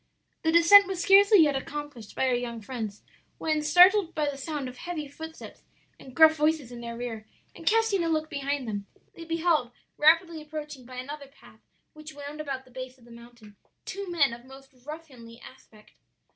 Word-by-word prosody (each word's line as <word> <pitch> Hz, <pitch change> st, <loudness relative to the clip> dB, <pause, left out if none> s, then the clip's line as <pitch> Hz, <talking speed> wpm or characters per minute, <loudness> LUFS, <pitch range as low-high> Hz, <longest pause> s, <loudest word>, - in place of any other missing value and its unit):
"The 320 Hz, -, +1 dB
descent 365 Hz, +4 st, +7 dB
was 380 Hz, -2 st, -4 dB
scarcely 395 Hz, +1 st, +6 dB
yet 290 Hz, -2 st, +1 dB
accomplished 275 Hz, -5 st, -7 dB
by -, -, 0 dB
our 255 Hz, -, +2 dB
young 240 Hz, -1 st, -3 dB
friends, 220 Hz, -2 st, -6 dB, 0.3 s
when 310 Hz, -1 st, -1 dB
startled 355 Hz, +4 st, +5 dB
by 300 Hz, -1 st, 0 dB
the 285 Hz, -, -3 dB
sound 280 Hz, 0 st, -5 dB
of 255 Hz, 0 st, -10 dB
heavy 325 Hz, -2 st, -5 dB
footsteps 320 Hz, +3 st, -10 dB, 0.4 s
and 260 Hz, -1 st, -14 dB
gruff 320 Hz, -1 st, +7 dB
voices 305 Hz, -4 st, 0 dB
in 240 Hz, -1 st, -9 dB
their 235 Hz, 0 st, -7 dB
rear, 225 Hz, -3 st, -6 dB, 0.3 s
and -, -, -13 dB
casting 450 Hz, -4 st, +2 dB
a 330 Hz, -, -1 dB
look 310 Hz, -1 st, 0 dB
behind 280 Hz, -3 st, -3 dB
them, 205 Hz, -2 st, -5 dB, 0.3 s
they 335 Hz, -, -11 dB
beheld, 330 Hz, -5 st, +1 dB, 0.3 s
rapidly 325 Hz, +1 st, +3 dB
approaching 300 Hz, -4 st, -8 dB
by 255 Hz, -, -11 dB
another 280 Hz, +3 st, -7 dB
path 275 Hz, -, -20 dB, 0.3 s
which 310 Hz, 0 st, -11 dB
wound 290 Hz, +1 st, -7 dB
about 270 Hz, -3 st, -5 dB
the 255 Hz, -, -20 dB
base 255 Hz, +1 st, -8 dB
of 240 Hz, -, -21 dB
the 240 Hz, -, -17 dB
mountain, 235 Hz, -3 st, -15 dB, 0.3 s
two 395 Hz, -1 st, -6 dB
men 295 Hz, -8 st, +2 dB
of 235 Hz, 0 st, -10 dB
most 270 Hz, +1 st, -15 dB
ruffianly 260 Hz, -7 st, -10 dB
aspect. 220 Hz, -5 st, -17 dB
290 Hz, 185 wpm, -27 LUFS, 250-320 Hz, 0.4 s, descent